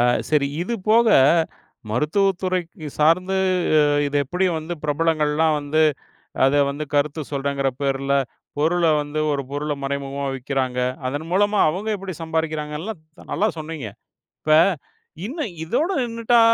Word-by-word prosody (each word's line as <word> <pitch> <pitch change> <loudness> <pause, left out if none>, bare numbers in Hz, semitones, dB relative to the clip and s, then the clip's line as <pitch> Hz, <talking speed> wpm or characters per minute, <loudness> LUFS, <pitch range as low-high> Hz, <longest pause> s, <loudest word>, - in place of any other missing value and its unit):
ஆ - - +5 0.3
சரி. 150 -2 +3 0.2
இது 235 +7 -2 0.2
போக, 230 +2 +5 0.8
மருத்துவ 150 - +2
துறை 185 -1 +1 0.4
சார்ந்து, 180 +5 +3 0.4
அ, - - +6 0.3
இது 145 0 -1
எப்படி 180 +7 -1
வந்து 160 +3 -5
பிரபலங்கள் 155 0 +1
எல்லாம் 160 0 +3
வந்து, 150 +2 +1 0.6
அத 135 - +3 0.2
வந்து 145 +2 -4
கருத்து 150 +2 +1
சொல்றகற 140 -1 0
பேர்ல, 135 0 0 0.4
பொருள 170 +3 +2 0.2
வந்து 145 +1 -4
ஒரு 140 -1 -1
பொருள 150 +1 -2
மறைமுகமா 140 0 -3
விக்கறாங்க. 130 -1 -2 0.3
அதன் 145 +4 -4
மூலமா, 205 +2 +2
அவங்க 190 +7 -4
எப்படி 190 -2 -6
சம்பாரிக்கிறாங்க, 160 -2 -2
எல்லா, 220 +6 -4 0.4
நல்லா 215 - +2
சொன்னீங்க. 155 -6 -5 0.5
இப்ப, 155 - +1 0.7
இன்னும் 275 - -4
இதோட 290 - 0
நின்னுட்டா, 230 0 +2
155 Hz, 135 wpm, -22 LUFS, 140-185 Hz, 0.8 s, அ